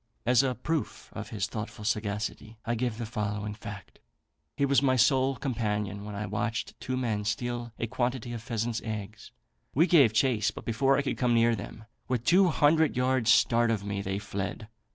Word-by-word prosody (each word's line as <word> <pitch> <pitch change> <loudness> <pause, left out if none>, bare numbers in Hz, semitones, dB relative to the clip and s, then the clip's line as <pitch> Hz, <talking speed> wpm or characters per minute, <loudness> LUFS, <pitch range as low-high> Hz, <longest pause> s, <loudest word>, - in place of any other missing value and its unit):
As 125 +1 +5
a 130 -2 0
proof 155 +6 -3
of - - -6
his 105 -3 -2
thoughtful 105 -1 -6
sagacity, 105 +1 -2
I 120 - 0
give 120 -1 -1
the 115 - -4
following 105 -2 -3
fact. 105 -2 -10 0.6
He 140 - +3
was 140 0 +3
my 130 -2 +3
sole 135 +1 +3
companion 105 -6 -2
when 105 -1 -6
I 105 +1 -3
watched 115 +4 -2
two 130 0 -3
men 110 -5 -1
steal 120 +3 -2
a - - -1
quantity 120 0 -2
of 115 - -5
pheasants' 115 -1 -2
eggs: 110 -1 -6 0.5
we 160 +5 +5
gave 150 - +6
chase; 115 -2 +2
but - - -9
before 135 +4 +2
I 140 - +1
could 140 - -3
come 125 -2 +3
near 115 0 +4
them, 110 +1 -9 0.2
with 125 -3 -1
two 185 +2 +5
hundred 155 -2 +3
yards 125 -2 +2
start 120 -1 +4
of 110 -3 0
me, 100 -1 -2
they 95 0 -2
fled. 100 +1 -5
115 Hz, 190 wpm, -28 LUFS, 105-130 Hz, 0.6 s, gave